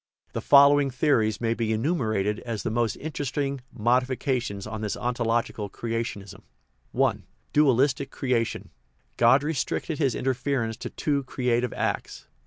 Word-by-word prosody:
The - - -3
following 140 0 +6
theories 120 -6 +1
may 115 -1 +1
be 115 -1 -1
enumerated 110 - 0
as 115 -4 -5
the - - -2
most 115 0 0
interesting 140 -2 -3
modifications 125 -2 0
of 110 0 -6
this 105 -2 -2
ontological 120 -3 -1
creationism: 115 -3 -5 0.6
I. - - +3 0.4
Dwtiistic 140 -1 +3
creation. 125 -4 -2 0.5
God 125 +4 +5
restricted 155 +1 -2
his 135 -6 +1
interference 130 -3 -1
to - - -6
two 145 -2 -1
creative 125 -2 0
acts. - - -3
120 Hz, 125 wpm, -26 LUFS, 115-140 Hz, 0.6 s, following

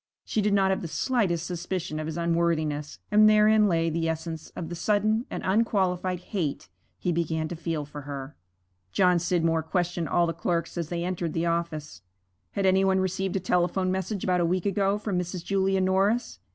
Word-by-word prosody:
She 215 - 0
did 205 0 +2
not 190 -1 +3
have 190 - 0
the 170 - -4
slightest 175 - 0
suspicion 175 -2 -3
of 155 - -3
his 160 +1 -4
unworthiness, 165 -3 0
and 215 +1 +7
therein 215 0 +5
lay 165 -3 +1
the 165 0 0
essence 160 0 -4
of 165 - -5
the - - -5
sudden 215 +5 +1
and - - -5
unqualified 185 -3 +1
hate 175 -8 -3 0.3
he 180 - -1
began 160 -1 -1
to 175 - -4
feel 160 -2 -3
for 145 +1 -8
her. 140 0 -7 0.6
John 180 -2 +4
Scidmore 165 -2 +1
questioned 175 0 -1
all 175 - +3
the 165 - -1
clerks 170 0 -2
as 170 -3 -3
they 170 -1 -2
entered 175 -3 -2
the 165 +1 0
office. 165 - -2 0.5
Had 200 - 0
any 190 0 +4
one 190 0 +3
received 190 0 -1
a - - +2
telephone 180 +1 +1
message 190 +1 -2
about 180 -1 +2
a - - +3
week 180 +1 0
ago 200 0 +1
from 205 -3 -2
Mrs. 180 0 -5
Julia 195 -1 +1
Norris? 190 - +1
175 Hz, 190 wpm, -27 LUFS, 165-190 Hz, 0.6 s, and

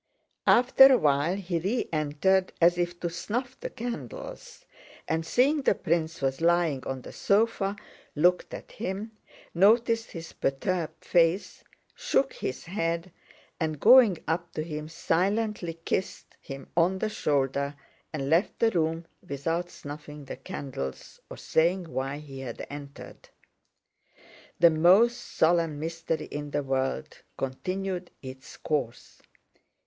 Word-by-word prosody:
After 260 +2 +7
a 260 - +6
while 145 +2 +2
he 180 -3 -2
re 205 +9 -1
entered 155 +5 +2
it - - -21
as 175 +1 +4
if 175 0 -2
to 175 - -1
snuff 245 +8 -3
the - - -5
candles, 225 - -7 0.4
and, 160 +1 0
seeing 275 - +2
the 240 - +3
prince 165 -2 -1
was 135 +2 0
lying 170 -5 +2
on 130 -1 -4
the - - -9
sofa, 200 -1 +1 0.4
looked 175 +4 +2
at - - -9
him, 210 +1 -4 0.4
noticed 230 +5 +3
his 165 -1 -8
perturbed 160 +5 -2
face, 170 +2 +2 0.3
shook - - 0
his - - -5
head, 170 -1 -2 0.5
and 155 -3 -2
going 230 - +7
up 165 +2 -1
to 155 - -2
him 155 -1 -6
silently 185 +2 0
kissed 190 - -3
him 135 -1 -9
on 175 +3 +3
the 215 - -1
shoulder 140 -6 0 0.4
and 140 -3 -3
left 165 +7 +2
the 225 -1 +3
room 165 -2 0 0.2
without 165 +5 -2
snuffing 150 -1 -9
the - - -6
candles 70 - -6
or - - -8
saying 175 +2 +1
why 135 -2 -3
he 140 -3 -9
had 125 -3 -6
entered. 140 -1 -10 1.3
The 170 -1 +7
most 190 +10 +5
solemn 165 -2 +1
mystery 165 0 -3
in 145 0 -6
the 145 0 -1
world 135 - -2 0.2
continued 185 +6 -3
its 130 0 -10
course. 135 -7 -3
165 Hz, 135 wpm, -27 LUFS, 145-190 Hz, 1.3 s, After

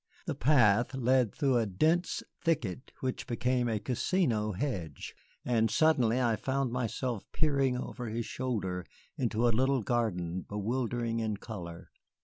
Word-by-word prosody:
The - - -1
path 120 -3 +4
led 130 -3 +3
through 135 -5 +2
a 115 -2 +1
dense 160 - +1 0.2
thicket 125 - -1
which 130 -1 -3
became 125 +1 +1
a 110 - 0
casino 120 - 0
hedge, 90 - -4 0.3
and 115 -2 +2
suddenly 125 -2 +3
I 115 -3 +2
found 135 0 -1
myself 120 -2 -2
peering 140 -5 +1
over 125 -1 -5
his 115 +1 -2
shoulder 100 -10 -2 0.3
into 120 -1 +1
a 120 - +3
little 130 +1 +2
garden 95 -7 -1
bewildering 115 +3 -2
in 110 -2 -1
color. 85 -7 -8
120 Hz, 135 wpm, -31 LUFS, 110-130 Hz, 0.3 s, path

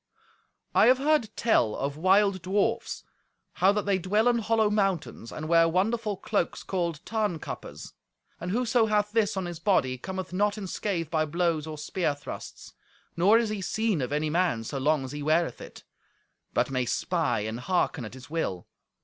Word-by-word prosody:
I - - +6
have 255 +1 +6
heard 290 -4 +2
tell 120 - +2
of 140 +1 -3
wild 190 +3 +3
dwarfs: 205 +5 -1 0.5
how 185 +2 +4
that 210 0 -1
they 195 -2 +2
dwell 210 +6 +1
in 240 -1 +3
hollow 220 -1 +2
mountains, 190 - -1
and 155 - -6
wear 165 0 +5
wonderful 210 +4 0
cloaks 170 - -2
called 170 -5 -2
Tarnkappes. 210 -8 -4 0.5
And 175 - -5
whoso 235 +2 +2
hath 210 -1 +1
this 215 -3 +1
on 190 - -1
his 175 -2 -6
body 130 -10 +1
cometh 185 +3 -5
not 205 +2 +1
in 205 - -5
scathe 175 -4 -3
by 155 -2 +2
blows 165 -1 0
or 155 -1 -6
spear 155 0 -1
thrusts; 145 - -9 0.4
nor 195 +6 +5
is 230 -2 +1
he 210 -2 -3
seen 215 -3 0
of 125 - -3
any 150 +1 0
man 170 -9 +1
so 135 +4 -4
long 145 0 +1
as 130 - -7
he 145 0 -5
weareth 160 +3 +1
it, - - -11 0.7
but - - 0
may 130 -1 0
spy 160 - 0
and 110 +3 -4
hearken 175 -2 0
at 110 +3 -8
his 130 0 -12
will. 145 - -3
180 Hz, 180 wpm, -27 LUFS, 155-210 Hz, 0.7 s, I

